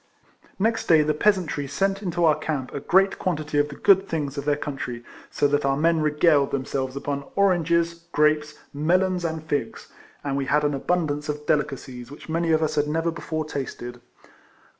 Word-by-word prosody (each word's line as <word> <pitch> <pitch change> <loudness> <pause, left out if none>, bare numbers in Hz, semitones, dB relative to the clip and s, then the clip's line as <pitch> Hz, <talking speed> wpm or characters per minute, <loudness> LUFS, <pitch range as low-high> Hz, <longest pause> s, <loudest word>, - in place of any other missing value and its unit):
Next 225 +3 0
day 160 -2 +6
the 155 0 +1
peasantry 170 -5 +1
sent 195 +7 -1
into 175 -3 0
our 155 - +6
camp 140 -4 -4
a 140 - -3
great 190 +7 +2
quantity 155 -4 -1
of 145 0 +1
the 140 - -8
good 195 +3 +4
things 145 -4 -2
of 140 -1 -5
their 145 -1 +2
country, 135 -5 -5 0.3
so 145 - +1
that 145 +1 +1
our 135 0 +1
men 165 +1 +2
regaled 150 -1 +3
themselves 130 -1 -3
upon 140 0 -3
oranges, 170 -3 +2 0.2
grapes, 150 0 +2 0.2
melons, 180 +5 +1
and 160 -1 -3
figs, 145 -7 -3 0.3
and 140 -1 -2
we 140 - -1
had 150 +3 +2
an 145 0 +1
abundance 150 0 -1
of 150 0 -4
de - - +4
licacies 130 -4 -6
which 145 - -12
many 165 +1 0
of 160 0 +3
us 155 - 0
had 145 0 +1
never 165 +2 0
before 155 -1 -4
tasted. 120 -4 -6
150 Hz, 185 wpm, -24 LUFS, 140-170 Hz, 0.3 s, day